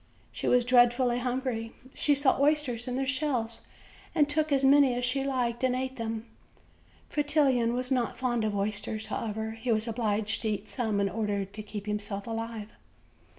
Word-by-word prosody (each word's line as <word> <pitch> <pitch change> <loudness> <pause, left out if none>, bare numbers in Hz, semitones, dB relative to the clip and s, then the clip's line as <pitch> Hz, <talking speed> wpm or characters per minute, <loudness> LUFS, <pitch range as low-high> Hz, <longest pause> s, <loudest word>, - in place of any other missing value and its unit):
She - - -4
was 245 -1 +4
dreadfully 245 0 +4
hungry. 245 -2 -2 0.2
She 290 - +2
saw 275 -1 +2
oysters 280 -5 +1
in 250 - -2
their 270 +1 0
shells, 260 -4 -1 0.5
and 295 -3 +4
took 305 +1 0
as 275 -1 +3
many 275 -2 +6
as 245 0 0
she 270 +2 +1
liked 250 -3 -1
and 255 -1 +2
ate 260 +1 -3
them. 225 -1 -4 0.8
Fretillon 280 -6 +2
was 250 +1 -2
not 250 -3 0
fond 240 -3 0
of 215 -1 -1
oysters; 210 +2 -2
however, 220 0 -3
he 225 +2 -3
was 220 +1 +1
obliged 220 -2 0
to 220 - -1
eat 210 0 -3
some 220 -5 -1
in 200 - +2
order 205 -1 -1
to 200 +3 -9
keep 205 -1 -7
himself 205 -1 -3
alive. 225 -2 -5
240 Hz, 175 wpm, -29 LUFS, 220-260 Hz, 0.8 s, many